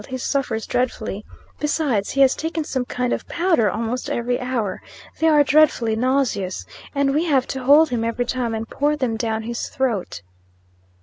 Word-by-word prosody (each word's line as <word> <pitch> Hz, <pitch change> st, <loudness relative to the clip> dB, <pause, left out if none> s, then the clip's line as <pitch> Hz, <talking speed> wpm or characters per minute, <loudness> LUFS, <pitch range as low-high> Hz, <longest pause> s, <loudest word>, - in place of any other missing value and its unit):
He 260 Hz, -, -3 dB
suffers 250 Hz, -4 st, -1 dB
dreadfully. 225 Hz, -4 st, -2 dB, 0.4 s
Besides, 290 Hz, -9 st, 0 dB
he 275 Hz, -, +1 dB
has 270 Hz, -1 st, +5 dB
taken 320 Hz, 0 st, -3 dB
some 260 Hz, -4 st, -2 dB
kind 250 Hz, 0 st, -1 dB
of -, -, -4 dB
powder 335 Hz, -, +2 dB
almost 230 Hz, +5 st, -3 dB
every 245 Hz, +1 st, -1 dB
hour. 245 Hz, -6 st, -2 dB, 0.4 s
They 325 Hz, -, +3 dB
are 300 Hz, -2 st, +6 dB
dreadfully 275 Hz, -6 st, +3 dB
nauseous; 240 Hz, -6 st, 0 dB, 0.3 s
and 280 Hz, -1 st, +2 dB
we 310 Hz, +4 st, +1 dB
have 275 Hz, -6 st, +2 dB
to 265 Hz, -1 st, -4 dB
hold 300 Hz, +4 st, +6 dB
him, 235 Hz, -2 st, -1 dB
every 230 Hz, +2 st, -1 dB
time, 245 Hz, -2 st, -2 dB
and 220 Hz, +1 st, -4 dB
pour 295 Hz, +5 st, 0 dB
them 255 Hz, -6 st, -1 dB
down 220 Hz, -1 st, -2 dB
his 235 Hz, +1 st, -4 dB
throat. 215 Hz, -, -2 dB
250 Hz, 175 wpm, -21 LUFS, 225-280 Hz, 0.4 s, are